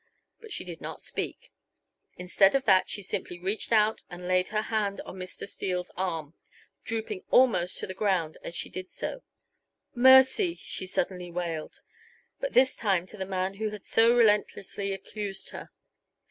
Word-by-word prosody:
But 445 -2 -13
she - - -3
did - - -8
not - - -7
speak. - - -5 0.7
Instead 190 +4 +3
of 270 0 +1
that 185 - +4
she 205 - -5
simply 180 -2 -4
reached 195 +6 -2
out 220 -1 +3
and 180 0 -8
laid 185 0 +2
her 215 0 -1
hand 210 -3 -1
on - - -10
Mr. 185 +1 -7
Steele's 180 -2 -3
arm, 165 -5 -3 0.5
drooping 220 -4 -3
almost 190 -9 +4
to - - -3
the 185 - -6
ground 185 -6 0
as 170 - -6
she - - -3
did 185 0 -7
so. - - -5 0.7
"Mercy!" 265 - +6
she 185 - -6
suddenly 180 -1 -2
wailed, 170 -3 -4 0.6
but - - -3
this 260 0 +5
time 190 -5 +1
to 210 - -13
the 190 -1 -4
man 190 0 -2
who 215 0 -1
had 210 -1 -9
so 230 +2 +5
relentlessly 205 -3 +2
accused 195 0 -5
her. - - -8
195 Hz, 165 wpm, -28 LUFS, 185-220 Hz, 0.7 s, Mercy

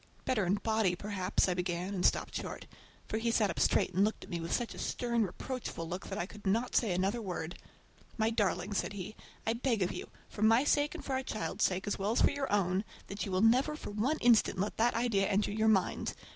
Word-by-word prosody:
"Better 215 -8 +1
in 190 - +3
body 220 -4 +1
perhaps"—I 190 -1 0
began, 180 +1 -2
and 180 -2 -2
stopped - - +2
short, - - -5 0.4
for 220 - -2
he 230 +1 0
sat 215 -4 +2
up - - -5
straight 185 - +2
and 190 +3 +3
looked 215 +1 -1
at - - -12
me 170 - -2
with 165 - -5
such 240 - -1
a - - -10
stern, 235 -1 -1
reproachful 205 -3 -5
look 180 +3 -5
that - - -4
I 175 - -1
could 205 +1 -9
not 230 +6 +1
say 225 -5 +3
another 195 +6 0
word. 175 -4 -4 0.6
"My 220 0 +2
darling," 205 -2 0
said 200 - -1
he, 200 +1 -6 0.3
"I 225 - +2
beg 230 -4 0
of 180 - -1
you, - - -6 0.2
for - - -9
my 225 +4 +5
sake 290 0 +2
and - - -8
for 270 - -2
our 260 - +1
child's 215 -4 -1
sake, 185 +1 -1
as 205 - -2
well 200 +3 0
as - - +2
for - - +5
your 280 -1 -3
own, 190 -1 +2 0.3
that 200 +1 -4
you - - -4
will 185 0 +1
never 250 +7 +4
for 300 - -7
one 240 +10 0
instant 235 -4 +4
let 200 +3 -2
that 235 +2 +2
idea 225 -4 +2
enter 205 +1 +1
your 220 +1 +1
mind! 200 -4 +1
210 Hz, 240 wpm, -32 LUFS, 190-230 Hz, 0.6 s, my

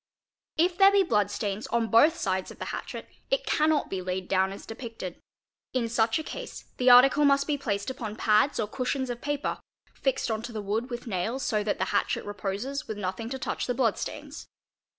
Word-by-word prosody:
If 350 +3 +2
there 390 0 +8
be 400 -1 +5
blood 210 - +2
stains 205 0 -3
on 230 -1 0
both 300 +9 +6
sides 190 - -1
of - - -11
the - - -5
hatchet - - -6 0.2
it - - +1
cannot 310 0 +2
be 190 -1 -3
laid 185 0 -3
down 190 0 +2
as 195 - -9
depicted; 225 -6 -7 0.5
in 250 -3 0
such 225 -1 +2
a 315 - -3
case - - -7
the 250 0 +4
article 260 +4 +7
must 280 -1 +4
be 300 - 0
placed 215 -4 -2
upon 220 -5 -6
pads 220 +5 +3
or 215 - 0
cushions 255 +3 -2
of 240 - -6
paper, 290 0 -2 0.3
fixed 265 -3 -1
on 220 0 -1
to 235 - -7
the 220 - -4
wood 220 +5 -2
with 240 -1 -5
nails 225 +5 -2
so 210 -1 0
that 205 - -1
the - - 0
hatchet 200 - 0
reposes 205 +8 -4
with 215 - -4
nothing 200 +3 -3
to 265 - -3
touch - - -3
the 245 - 0
blood 235 -4 +2
stains. - - -7
235 Hz, 210 wpm, -28 LUFS, 205-275 Hz, 0.5 s, there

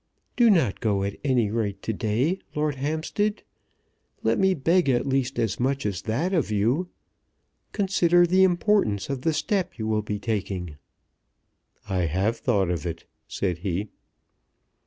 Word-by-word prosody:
"Do 240 -2 +5
not 170 - +3
go 100 -3 0
at 100 0 -3
any 125 -7 +2
rate 105 -3 -2
to 110 - -2
day, 120 - 0 0.2
Lord 150 0 0
Hampstead. 160 +9 -2 0.8
Let - - +2
me 190 -1 +3
beg 165 +2 +2
at 120 -1 +2
least 135 -1 0
as 110 -4 -1
much 135 +2 0
as 100 -3 -2
that 145 - -1
of 160 - +1
you. 120 - +1 0.8
Consider 175 -3 +3
the 185 +2 +4
importance 175 - +2
of 135 -2 -3
the 160 - +1
step 190 - -1
you 110 - -3
will 110 -1 +1
be 105 0 -3
taking." 95 -7 -3 1.1
"I 90 -3 0
have 95 +8 0
thought 100 -9 +1
of 85 -4 -2
it," 85 0 -6 0.2
said 90 -4 -2
he. 95 +3 -3
120 Hz, 155 wpm, -25 LUFS, 100-170 Hz, 1.1 s, Do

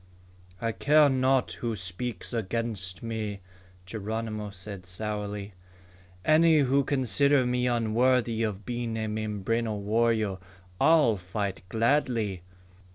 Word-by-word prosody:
"I 115 0 -1
care 150 +5 +4
not 130 0 +2
who 115 -2 -3
speaks 95 +4 -4
against 110 -4 -1
me," 110 -3 -4 0.4
Geronimo 110 +1 -4
said 95 -1 -7
sourly. 105 +1 -3 0.7
"Any 160 0 +5
who 140 +1 +3
consider 140 +1 +2
me 125 0 0
unworthy 120 0 +2
of 105 -3 -2
being 120 -2 -3
a 110 0 -2
Mimbreno 110 +1 -2
warrior 110 -1 +1 0.4
I'll 145 -7 +5
fight 95 +2 -4
gladly." 115 -5 +1
115 Hz, 105 wpm, -28 LUFS, 105-125 Hz, 0.7 s, Any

